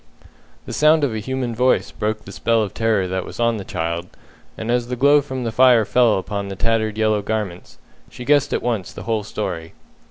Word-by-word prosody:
The -, -, -6 dB
sound 155 Hz, 0 st, +4 dB
of 135 Hz, -5 st, +1 dB
a 110 Hz, -, -2 dB
human 125 Hz, +1 st, -3 dB
voice 125 Hz, +3 st, +2 dB
broke 110 Hz, 0 st, -3 dB
the -, -, -9 dB
spell 115 Hz, -1 st, +1 dB
of 100 Hz, -, -5 dB
terror 110 Hz, -4 st, +1 dB
that 95 Hz, 0 st, -2 dB
was -, -, -10 dB
on 115 Hz, -1 st, +2 dB
the 100 Hz, -, -5 dB
child, 85 Hz, 0 st, -3 dB, 0.5 s
and 110 Hz, +1 st, -3 dB
as 120 Hz, -1 st, 0 dB
the 125 Hz, -, -3 dB
glow 145 Hz, +3 st, +5 dB
from 130 Hz, -2 st, -5 dB
the 115 Hz, -, -2 dB
fire 125 Hz, -2 st, +5 dB
fell 120 Hz, -1 st, +3 dB
upon 100 Hz, +1 st, -4 dB
the 95 Hz, -, -5 dB
tattered 110 Hz, +1 st, 0 dB
yellow 110 Hz, -1 st, +2 dB
garments, 100 Hz, -4 st, -4 dB, 0.3 s
she 125 Hz, -, -9 dB
guessed 145 Hz, 0 st, +3 dB
at -, -, -1 dB
once 110 Hz, -7 st, -2 dB
the -, -, -9 dB
whole 110 Hz, -2 st, -1 dB
story. 90 Hz, -6 st, -5 dB
110 Hz, 215 wpm, -21 LUFS, 100-125 Hz, 0.5 s, glow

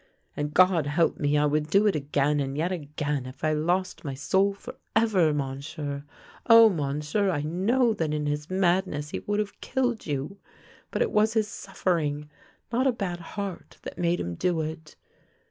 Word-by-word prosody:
And, 150 Hz, 0 st, -2 dB
God 175 Hz, -2 st, +4 dB
help 160 Hz, +3 st, +1 dB
me! 145 Hz, 0 st, +2 dB
I 150 Hz, -, +3 dB
would 150 Hz, +1 st, +1 dB
do 200 Hz, +5 st, +4 dB
it 205 Hz, -, +3 dB
again 145 Hz, 0 st, +1 dB
and 135 Hz, 0 st, -2 dB
yet 170 Hz, +4 st, 0 dB
again, 145 Hz, -5 st, -3 dB
if 130 Hz, +1 st, -12 dB
I 155 Hz, 0 st, +2 dB
lost 175 Hz, +5 st, -1 dB
my 140 Hz, -3 st, -4 dB
soul 190 Hz, +8 st, +2 dB
forever. 200 Hz, -5 st, 0 dB
Monsieur. 140 Hz, +1 st, -4 dB, 0.4 s
Oh, 230 Hz, -1 st, +9 dB
Monsieur, 150 Hz, +4 st, -1 dB
I 145 Hz, -5 st, -1 dB
know 220 Hz, +10 st, +2 dB
that 160 Hz, -7 st, -2 dB
in 150 Hz, -1 st, -1 dB
his 150 Hz, 0 st, -2 dB
madness 180 Hz, -5 st, 0 dB
he -, -, -3 dB
would 205 Hz, 0 st, -2 dB
have 210 Hz, -1 st, -3 dB
killed 245 Hz, -3 st, -1 dB
you, 145 Hz, +7 st, -3 dB, 0.5 s
but -, -, +1 dB
it 465 Hz, -, -2 dB
was 215 Hz, +1 st, +3 dB
his 220 Hz, -2 st, +1 dB
suffering, 155 Hz, -8 st, -2 dB, 0.4 s
not 255 Hz, +3 st, +2 dB
a -, -, +4 dB
bad 190 Hz, -7 st, -4 dB
heart, 195 Hz, +2 st, -7 dB
that -, -, -8 dB
made 175 Hz, 0 st, +1 dB
him 85 Hz, -, -3 dB
do 170 Hz, -, 0 dB
it. 160 Hz, 0 st, -6 dB
160 Hz, 180 wpm, -27 LUFS, 145-195 Hz, 0.5 s, Oh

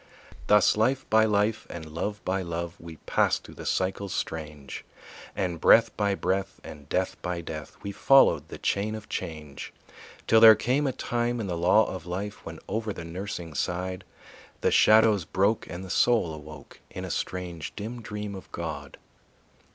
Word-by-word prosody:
Thus 105 Hz, -1 st, +5 dB
life 130 Hz, +5 st, +1 dB
by 110 Hz, 0 st, +6 dB
life 105 Hz, +1 st, +1 dB
and 85 Hz, -2 st, -7 dB
love 105 Hz, +6 st, -4 dB
by 95 Hz, +1 st, 0 dB
love 85 Hz, -1 st, -4 dB
We 85 Hz, -1 st, -10 dB
passed -, -, +1 dB
through -, -, -12 dB
the -, -, -8 dB
cycles 95 Hz, +1 st, -1 dB
strange, 75 Hz, -4 st, -5 dB, 0.5 s
And 85 Hz, -4 st, -2 dB
breath 115 Hz, -, +6 dB
by 100 Hz, -2 st, +1 dB
breath 95 Hz, 0 st, -2 dB
and 75 Hz, -1 st, -11 dB
death 95 Hz, 0 st, -1 dB
by 90 Hz, -1 st, -3 dB
death 80 Hz, -3 st, -8 dB
We 100 Hz, -, -4 dB
followed 135 Hz, +7 st, +4 dB
the -, -, -8 dB
chain 105 Hz, +2 st, -1 dB
of 110 Hz, -1 st, -10 dB
change. 75 Hz, -5 st, -6 dB, 0.5 s
Till 110 Hz, -, +5 dB
there 110 Hz, -1 st, +10 dB
came 135 Hz, +6 st, 0 dB
a -, -, +1 dB
time 120 Hz, -1 st, -2 dB
in 110 Hz, -, -2 dB
the 90 Hz, -3 st, -3 dB
law 90 Hz, +6 st, +4 dB
of 90 Hz, -2 st, -7 dB
life 100 Hz, +4 st, -5 dB
When -, -, -8 dB
over 110 Hz, -1 st, -2 dB
the 85 Hz, -, -8 dB
nursing 90 Hz, -1 st, -6 dB
side 90 Hz, +4 st, -3 dB, 0.6 s
The -, -, +2 dB
shadows 110 Hz, -3 st, +5 dB
broke 100 Hz, +7 st, 0 dB
and 85 Hz, +3 st, -6 dB
the 95 Hz, -, -7 dB
soul 110 Hz, -8 st, +3 dB
awoke 75 Hz, -1 st, -11 dB
In -, -, -6 dB
a -, -, -5 dB
strange, 90 Hz, -3 st, -4 dB
dim 115 Hz, +3 st, -6 dB
dream 105 Hz, -2 st, -5 dB
of 95 Hz, -, -10 dB
God. 75 Hz, -5 st, -6 dB
95 Hz, 175 wpm, -27 LUFS, 85-110 Hz, 0.6 s, there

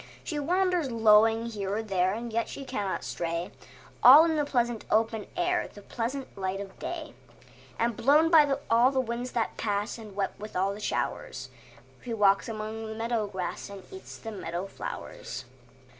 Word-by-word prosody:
She 300 Hz, -4 st, -3 dB
wanders 355 Hz, 0 st, +1 dB
lowing 225 Hz, 0 st, +5 dB
here 205 Hz, -4 st, -3 dB
and 225 Hz, 0 st, -4 dB
there, 185 Hz, -2 st, +2 dB
And 230 Hz, 0 st, -6 dB
yet 230 Hz, +1 st, 0 dB
she 275 Hz, -, -7 dB
cannot 205 Hz, -7 st, -3 dB
stray, 170 Hz, +1 st, -3 dB, 0.5 s
All 290 Hz, +6 st, +10 dB
in 325 Hz, -1 st, +1 dB
the 300 Hz, -, +2 dB
pleasant 240 Hz, -4 st, 0 dB
open 220 Hz, -1 st, +1 dB
air, 355 Hz, 0 st, +1 dB
The 205 Hz, -, -13 dB
pleasant 255 Hz, +5 st, -4 dB
light 190 Hz, 0 st, -3 dB
of 195 Hz, -1 st, -9 dB
day; 325 Hz, -3 st, -5 dB, 0.6 s
And 230 Hz, 0 st, 0 dB
blown 300 Hz, +8 st, +4 dB
by 300 Hz, -4 st, +7 dB, 0.2 s
all 235 Hz, +3 st, +5 dB
the 265 Hz, -1 st, 0 dB
winds 245 Hz, 0 st, -3 dB
that 230 Hz, -2 st, -1 dB
pass 205 Hz, +1 st, -2 dB
And 210 Hz, -3 st, -11 dB
wet 200 Hz, -1 st, 0 dB
with 215 Hz, +1 st, -8 dB
all 190 Hz, +2 st, +1 dB
the 205 Hz, -, -8 dB
showers, -, -, -3 dB, 0.5 s
She 235 Hz, -2 st, -3 dB
walks 200 Hz, 0 st, +3 dB
among 220 Hz, 0 st, -5 dB
the 220 Hz, -, -6 dB
meadow 225 Hz, -1 st, -1 dB
grass 190 Hz, -1 st, -5 dB
And 200 Hz, -1 st, -9 dB
eats 380 Hz, -, -9 dB
the 225 Hz, -, -7 dB
meadow 180 Hz, -3 st, -4 dB
flowers. 130 Hz, -9 st, -7 dB
225 Hz, 175 wpm, -28 LUFS, 200-260 Hz, 0.6 s, All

